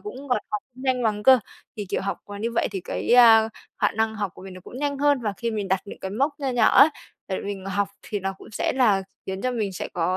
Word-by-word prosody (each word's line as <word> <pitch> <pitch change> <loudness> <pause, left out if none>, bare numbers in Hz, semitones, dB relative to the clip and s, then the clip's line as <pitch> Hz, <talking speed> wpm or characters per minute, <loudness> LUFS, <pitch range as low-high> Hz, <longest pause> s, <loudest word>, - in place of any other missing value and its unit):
cũng 420 - -8
còn 250 - +2
học 210 -1 -2
không 255 - -12
nhanh 255 -2 +1
bằng 210 -2 0
cơ. 260 +1 +7 0.4
Thì 205 -2 -5
kiểu - - -1
học 195 0 -3 0.2
như 230 - -1
vậy - - +1
thì 195 -2 -4
cái, - - -4
a, 225 -2 +7 0.3
khả - - +2
năng 220 0 -1
học 205 -3 -2
của - - -13
mình 190 -1 -9
nó 185 - -10
cũng 250 - -10
nhanh 285 -1 -1
hơn, 290 -1 +3
và 210 -2 -1
khi 235 -1 -2
mình 210 -3 -3
đặt 190 0 +1
những 200 - -10
cái 190 - -5
mốc 280 +7 -1
nho 275 - -1
nhỏ 240 -3 +4
ấy 295 - +9 0.4
để 190 - -2
mình 200 -2 -5
học 195 +1 0
thì 205 -2 -4
nó 195 +1 -2
cũng - - -13
sẽ - - 0
là 215 -7 +3 0.2
khiến 190 0 -4
cho 255 - +1
mình 215 -5 -2
sẽ - - -5
có, 180 +2 0
215 Hz, 280 wpm, -24 LUFS, 195-250 Hz, 0.4 s, ấy